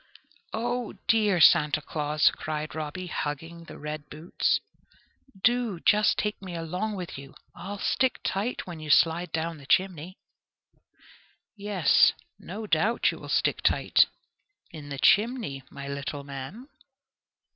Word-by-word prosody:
"O 240 +1 -2
dear 210 -5 +3
Santa 150 -1 +6
Claus!" 150 0 +1
cried 155 0 -5
Robby, 160 +4 -5
hugging 165 +1 -5
the - - -11
red 150 0 -6
boots, 155 +3 0 0.8
"do 240 -6 +2
just 210 +3 +3
take 210 -1 -2
me 185 -3 -7
along 180 +6 -3
with 180 -7 -6
you; 140 0 -12 0.2
I'll 200 +3 -7
stick 260 +5 +1
tight 210 +6 -2
when 175 -3 -8
you 155 -1 -8
slide 165 +4 +3
down 165 0 -3
the 140 - -14
chimney." 185 +1 0 1.4
"Yes, 200 -6 +4 0.3
no 210 +5 -7
doubt 210 +6 +2
you - - -9
will - - -10
stick - - +1
tight - - +4 0.6
in 150 -3 -9
the 140 - -5
chimney, 210 - +2
my 140 0 -8
little 140 +1 -5
man." 140 - -8
170 Hz, 135 wpm, -27 LUFS, 150-210 Hz, 1.4 s, Santa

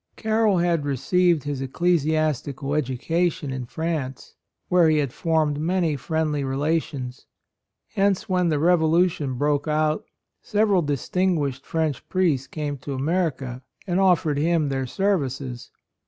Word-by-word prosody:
Carroll 220 -3 +2
had 170 -3 +1
received 165 +4 +2
his 145 -2 -3
ec 135 -1 -5
clesiastical 155 -4 0
education 150 +2 -1
in 130 -2 -5
France, 155 -4 -4 0.3
where 175 -2 +4
he 155 - +3
had 140 -4 -1
formed 155 -3 0
many 170 -1 +1
friendly 150 +1 -1
relations. 135 -2 -2 0.7
Hence 200 -2 +1
when 180 -2 +1
the 155 - +1
revolution 160 -3 +2
broke 145 +3 0
out 155 0 +1 0.4
several 205 -3 +2
distinguished 145 -1 -1
French 160 -5 -2
priests 160 -9 +1
came 145 -3 -4
to 140 +1 -5
America 135 -4 -1 0.2
and 180 -1 0
offered 170 -6 +3
him 160 -1 +1
their 135 -1 -2
services. 135 -9 -2
155 Hz, 125 wpm, -24 LUFS, 140-175 Hz, 0.7 s, where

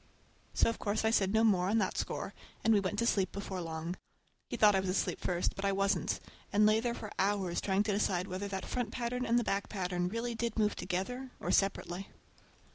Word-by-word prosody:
So - - +4
of 230 - -1
course 210 +1 0
I 220 - +4
said 195 -4 +3
no 220 +1 +3
more 190 -4 +3
on 220 - +3
that 195 -4 +1
score, - - -3 0.3
and 225 - +5
we 205 - +5
went 195 +1 -2
to 235 - +1
sleep 195 -5 +2
before 195 -2 -4
long. 165 +1 -4 0.5
He - - -3
thought 210 -1 +6
I 190 - +3
was 190 -1 -2
asleep 185 - 0
first, 175 -1 0
but 195 - -5
I 200 - +2
wasn't,—I 195 +1 -2
lay 215 +1 +6
there 235 +1 -1
for 215 - -7
hours 190 -3 +1
trying 195 +1 +2
to 210 - 0
decide 190 -3 +1
whether 190 +2 -3
that 190 -1 -4
front 245 -3 -2
pattern 250 +2 -2
and 235 - +3
the 240 - +3
back 200 -2 -1
pattern 180 -3 -1
really 230 +3 -2
did 230 -1 -2
move 210 -1 +2
together 220 +9 -3
or - - -2
separately. 195 -1 0
200 Hz, 220 wpm, -33 LUFS, 190-220 Hz, 0.5 s, thought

